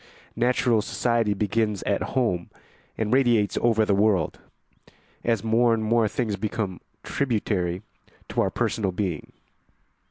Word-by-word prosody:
Natural 120 -1 +2
society 115 -2 0
begins 105 0 0
at - - 0 0.2
home 90 -9 0 0.5
and 110 +1 0
radiates 120 -6 +3
over 115 -2 +3
the 105 - +2
world, 100 -5 +2 0.8
as 115 -3 +1
more 115 +1 +3
and 110 - -3
more 115 0 +3
things 105 -2 -2
become 105 -3 -3 0.2
tributary 100 -8 -1 0.5
to - - 0
our - - +1
personal 100 -4 -1
being. 90 -4 -3
110 Hz, 125 wpm, -25 LUFS, 100-115 Hz, 0.8 s, radiates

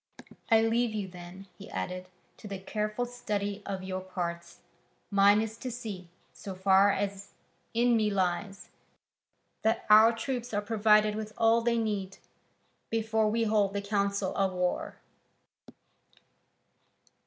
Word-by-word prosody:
I 225 -1 +5
leave 230 0 +1
you 205 -2 -3
then," 180 +1 -11
he 200 - -10
added, 185 0 -5 0.3
"to 215 - -10
the 200 -1 -5
careful 215 +4 -3
study 205 -4 -3
of 190 -2 -4
your 185 0 -4
parts: 170 -2 -5 0.5
mine 200 +1 +5
is 225 0 -6
to 255 - -5
see, 210 -7 -7 0.2
so 195 -2 -8
far 190 +1 +4
as 200 0 -4 0.4
in 240 +1 +3
me 215 -2 +2
lies, 195 +1 -2 0.9
that 225 +1 0
our 220 +2 +8
troops 240 0 -4
are 205 - +1
provided 215 0 +3
with 215 0 -5
all 230 +1 +4
they 235 0 +1
need, 205 -4 -2 0.7
before 220 -1 +1
we 230 +2 +1
hold 210 -3 +2
the 200 - -1
council 200 -1 -1
of 195 -1 +1
war." 180 0 -2
205 Hz, 135 wpm, -29 LUFS, 190-225 Hz, 0.9 s, our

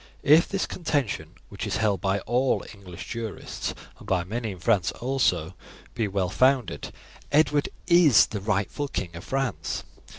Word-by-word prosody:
If 155 +4 +6
this 195 -1 -1
contention, 120 - -2
which 100 +2 -5
is 100 - -1
held 105 -3 +1
by 100 0 0
all 125 +5 +1
English 95 -4 -10
jurists, 115 -3 -5 0.2
and - - -13
by 90 -2 +1
many 110 +5 -3
in - - -11
France 95 -3 +2
also, 105 -10 0 0.4
be 110 - 0
well 95 -2 -1
founded, 130 - +2 0.4
Edward 150 -1 +3 0.2
is 170 - +6
the 105 -2 -5
rightful 105 +7 -1
King 85 -10 -4
of 85 - -8
France. 130 - -2
110 Hz, 155 wpm, -26 LUFS, 95-135 Hz, 0.4 s, If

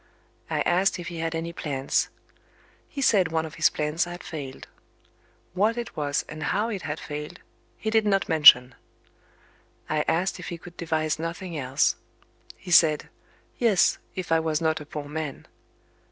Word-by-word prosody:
I - - 0
asked 185 +3 +2
if 175 -1 -6
he 170 -1 -7
had 165 0 -2
any 165 +1 -4
plans. 140 -6 -1 0.8
He 275 - -4
said 190 -9 +3
one 160 0 0
of 155 - -9
his - - +3
plans 150 +3 -1
had 175 0 -8
failed. 140 -5 -7 0.9
What 210 +5 +1
it 240 - -5
was, 145 -1 -1
and 155 0 -8
how 205 +9 0
it 200 -5 -4
had 150 +1 -4
failed, 150 0 -7 0.4
he 220 - -3
did 220 -1 +3
not 195 -2 +2
mention. 135 -6 +7 1.1
I 150 -1 0
asked 180 +3 0
if 175 - -8
he 170 - -5
could 170 +1 -13
devise 155 -2 -1
nothing 170 +1 -5
else. 135 -2 +1 0.6
He 180 - -9
said, 155 -3 +5 0.5
"Yes, 225 -6 +3 0.2
if 185 -3 -5
I 165 - +5
was 160 -1 0
not 160 -2 0
a 150 - -10
poor 150 -1 -6
man." 150 -1 -5
165 Hz, 170 wpm, -26 LUFS, 150-180 Hz, 1.1 s, mention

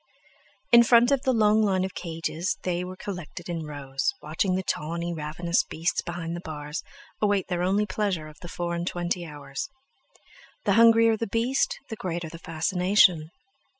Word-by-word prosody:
In 235 0 +9
front 235 +2 +5
of 275 -2 +3
the 260 - +2
long 215 -2 +4
line 190 -3 +2
of 190 - -6
cages 170 +2 -3
they 180 -1 -1
were 185 +1 -6
collected 175 -3 -7
in 165 -3 -4
rows, 135 - -2
watching 165 +5 -1
the 190 - -1
tawny, 170 +1 -2
ravenous 165 +2 0
beasts 165 +2 -1
behind 170 -1 -5
the - - -5
bars 150 0 -5 0.4
await 205 -3 +1
their 175 -1 -1
only 195 +4 +2
pleasure 190 -5 -2
of 155 - -14
the 175 - -8
four 170 0 -3
and 170 +1 -3
twenty 175 -1 -2
hours. 140 - -6 1.0
The - - +3
hungrier 230 -1 +6
the 230 - -2
beast, 255 - 0
the 220 - -4
greater 170 -5 -4
the 165 - -10
fascination. 175 0 +3
175 Hz, 170 wpm, -26 LUFS, 165-205 Hz, 1.0 s, In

